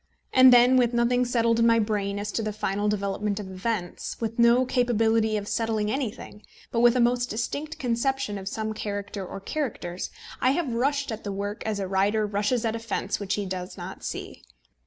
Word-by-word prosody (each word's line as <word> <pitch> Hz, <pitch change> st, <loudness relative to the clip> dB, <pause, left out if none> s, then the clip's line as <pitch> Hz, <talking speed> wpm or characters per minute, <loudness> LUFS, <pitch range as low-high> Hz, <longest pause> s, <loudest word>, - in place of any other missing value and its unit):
And 260 Hz, 0 st, +8 dB
then, 245 Hz, +1 st, +7 dB
with 240 Hz, -1 st, +2 dB
nothing 245 Hz, +1 st, +2 dB
settled 230 Hz, -1 st, +2 dB
in 230 Hz, -, +5 dB
my 230 Hz, 0 st, +5 dB
brain 205 Hz, -2 st, 0 dB
as 205 Hz, +1 st, -3 dB
to 225 Hz, -, -1 dB
the 215 Hz, -1 st, -2 dB
final 205 Hz, 0 st, -1 dB
development 200 Hz, 0 st, -1 dB
of 190 Hz, -2 st, -7 dB
events, 185 Hz, -1 st, -4 dB
with 225 Hz, 0 st, -3 dB
no 235 Hz, +2 st, +5 dB
capability 225 Hz, -3 st, +2 dB
of 205 Hz, -1 st, -5 dB
settling 220 Hz, -2 st, 0 dB
anything, 225 Hz, -5 st, -4 dB, 0.3 s
but 230 Hz, -, 0 dB
with 240 Hz, +1 st, +5 dB
a -, -, +2 dB
most 245 Hz, +1 st, +2 dB
distinct 290 Hz, +7 st, -3 dB
conception 245 Hz, -3 st, -1 dB
of 190 Hz, -, -8 dB
some 220 Hz, +1 st, -3 dB
character 200 Hz, -1 st, -4 dB
or 190 Hz, +1 st, -7 dB
characters, 195 Hz, -, -4 dB, 0.3 s
I 255 Hz, +1 st, +4 dB
have 300 Hz, -6 st, -1 dB
rushed 280 Hz, +3 st, 0 dB
at 220 Hz, -, -6 dB
the 205 Hz, -, -4 dB
work 205 Hz, +2 st, -4 dB
as 210 Hz, -2 st, -1 dB
a 195 Hz, -, -2 dB
rider 200 Hz, +3 st, +1 dB
rushes 210 Hz, +4 st, 0 dB
at 225 Hz, 0 st, 0 dB
a -, -, -3 dB
fence 225 Hz, -, -2 dB
which 200 Hz, -2 st, -1 dB
he 205 Hz, -, -3 dB
does 185 Hz, -1 st, -5 dB
not -, -, -8 dB
see. -, -, -6 dB
220 Hz, 200 wpm, -26 LUFS, 205-245 Hz, 0.3 s, And